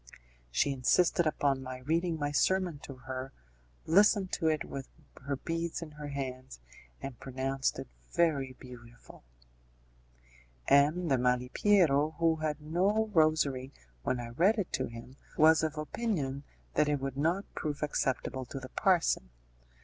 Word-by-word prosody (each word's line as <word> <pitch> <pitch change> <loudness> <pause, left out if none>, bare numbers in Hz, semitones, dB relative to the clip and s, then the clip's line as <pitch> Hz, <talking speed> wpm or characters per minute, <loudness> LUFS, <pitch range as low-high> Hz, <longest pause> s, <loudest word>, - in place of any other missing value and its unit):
She 100 - +1
insisted 160 +6 +3
upon 140 -3 +1
my 130 -1 -6
reading 165 +4 0
my 145 -1 -2
sermon 180 0 +1
to 135 - -9
her, 130 0 -5 0.5
listened 200 +2 +4
to 160 - 0
it 155 -1 +1
with 135 -1 -7 0.4
her 140 - 0
beads 165 +4 -3
in 155 - -9
her 150 0 -8
hands, 130 - -6 0.4
and 135 -3 -6
pronounced 135 +1 -2
it - - -6 0.2
very 140 -6 +1
beautiful. 120 - -14 1.4
M. 150 +5 +4
de 135 -4 +2
Malipiero, 140 +5 +3
who 165 -1 +2
had 155 -1 -2
no 195 +8 +1
rosary 150 -5 +2 0.3
when 125 - -1
I 120 -1 -5
read 180 - +3
it 200 -4 -3
to 130 - 0
him, 115 +3 -11 0.2
was 160 +1 +6
of 155 -1 -2
opinion 150 - -2 0.3
that 150 0 +2
it 145 -1 +1
would 135 -1 -4
not 165 +8 0
prove 150 -2 -3
acceptable 130 -2 -1
to 135 +3 -6
the 130 -1 -9
parson. 175 - +2
145 Hz, 145 wpm, -31 LUFS, 130-165 Hz, 1.4 s, was